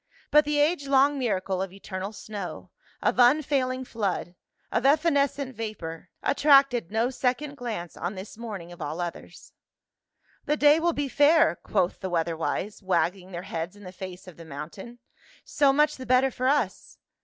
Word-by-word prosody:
But 300 0 +6
the 295 0 0
age 290 0 +2
long 275 +1 +4
miracle 190 -6 -1
of 190 -1 -3
eternal 195 0 -6
snow, 205 -3 -7 0.3
of - - +1
unfailing 260 0 +3
flood, 200 -7 -3 0.4
of 235 - 0
evanescent 280 -2 +2
vapor, 190 -8 -6
attracted 275 - +4
no 225 +4 0
second 265 +3 -1
glance 220 -10 -5
on 175 +4 -4
this 190 +2 -8
morning 205 -7 -7
of 175 -1 -12
all 155 +3 -4
others. 175 -1 -7 0.9
"The 300 - +1
day 295 +1 +6
will 340 +1 +1
be 290 -1 -2
fair," 290 - +4
quoth 175 +1 -1
the 190 - -4
weather 170 -1 0
wise, 190 +6 -3
wagging 185 0 0
their 175 0 -6
heads 170 +1 -5
in 205 - -15
the 180 - -8
face 185 0 -9
of 180 - -12
the 170 - -10
mountain. 165 +10 -9 0.3
" - - -27
So 280 -2 +6
much 300 +2 +2
the 260 - -8
better 255 +1 +4
for 255 +1 -2
us." 265 -8 -1
225 Hz, 170 wpm, -26 LUFS, 185-280 Hz, 0.9 s, But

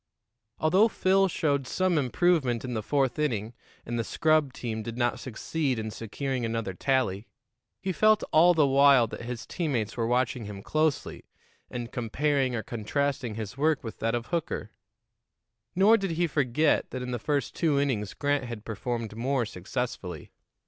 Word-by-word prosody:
Although 185 +8 +4
Phil 195 -2 +3
showed 140 -6 0
some 185 +4 +1
improvement 130 -3 +1
in 125 - -4
the 110 - -1
fourth 135 +3 0
inning, 115 -7 -1 0.3
and 120 0 -3
the - - +1
scrub 155 +1 +2
team 115 -3 -4
did 115 +2 -6
not 120 -1 0
succeed 130 +2 -2
in 110 0 -4
securing 125 +4 -3
another 115 -4 -2
tally, 120 -2 0 0.6
he 190 - 0
felt 215 +3 +4
all 170 +3 +6
the 155 -2 +5
while 140 -2 +6
that 110 - -8
his 120 0 -5
teammates 125 - -2
were 115 -2 -1
watching 120 -1 0
him 100 -1 -8
closely 155 +2 -1 0.4
and 120 -1 -5
comparing 130 +2 0
or 110 - -3
contrasting 125 +2 -2
his 110 +4 -6
work 155 0 +2
with 110 - -7
that 115 +1 0
of 120 -1 -3
Hooker; 170 +5 -3 1.0
nor 205 +5 +6
did 195 -3 -2
he 170 +1 +1
forget 145 -1 +1
that 130 -1 -5
in 125 - -4
the 120 - -2
first 145 +3 -1
two 155 -4 +1
innings 115 -8 -1
Grant 145 -2 0
had 115 -3 -7
performed 115 0 -4
more 125 +1 0
successfully. 90 -4 -5
130 Hz, 165 wpm, -28 LUFS, 115-150 Hz, 1.0 s, all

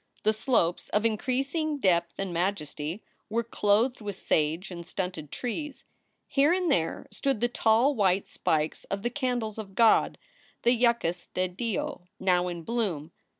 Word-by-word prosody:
The 215 - +3
slopes, 215 -7 +1
of 210 +2 +1
increasing 270 +7 0
depth 170 -7 +2
and 195 -2 -3
majesty, 170 -1 -2 0.3
were 230 +2 0
clothed 230 +2 +1
with 205 -2 -4
sage 160 +2 0
and 170 -1 -6
stunted 180 -5 -4
trees. 275 +4 -4 0.4
Here 285 +3 +3
and 360 -2 +2
there 165 -10 0
stood 270 -5 -1
the 240 - +2
tall 240 +3 +3
white 195 -5 +2
spikes 155 0 -1
of 195 +1 -4
the 240 - 0
"candles 245 -5 -2
of 195 -3 -8
God," 230 0 +4 0.5
the 240 - +5
yuccas 235 -8 +1
de 185 0 +1
Dios, 235 +8 -3 0.2
now 180 -1 +2
in 170 -2 -5
bloom. 180 -9 -2
210 Hz, 150 wpm, -28 LUFS, 180-245 Hz, 0.5 s, the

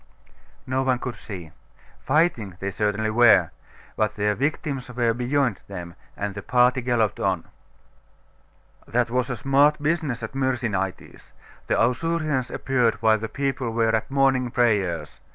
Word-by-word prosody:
No 130 +1 0
one 130 -1 +1
could 125 0 -5
see. 90 -7 -9 0.5
Fighting 130 - +1
they 100 0 -3
certainly 105 +2 -1
were: 120 0 +5 0.4
but 110 0 0
their 105 0 +1
victims 140 0 -2
were 120 -2 +1
beyond 125 -2 0
them, 90 -3 -7 0.2
and 100 0 -3
the 100 - -6
party 125 +4 +3
galloped 120 -3 0
on. 95 -3 0 1.4
'That 120 0 0
was 125 +1 0
a 125 - -3
smart 140 +5 +3
business 150 -6 -1
at 110 - -5
Myrsinitis. 120 -8 -3 0.3
The - - +1
Ausurians 135 +2 0
appeared 125 -4 +1
while 110 +1 +3
the 110 +1 -5
people 135 -2 -2
were 115 -1 +2
at 110 - -2
morning 135 -2 +2
prayers. 95 - 0
120 Hz, 140 wpm, -24 LUFS, 105-130 Hz, 1.4 s, were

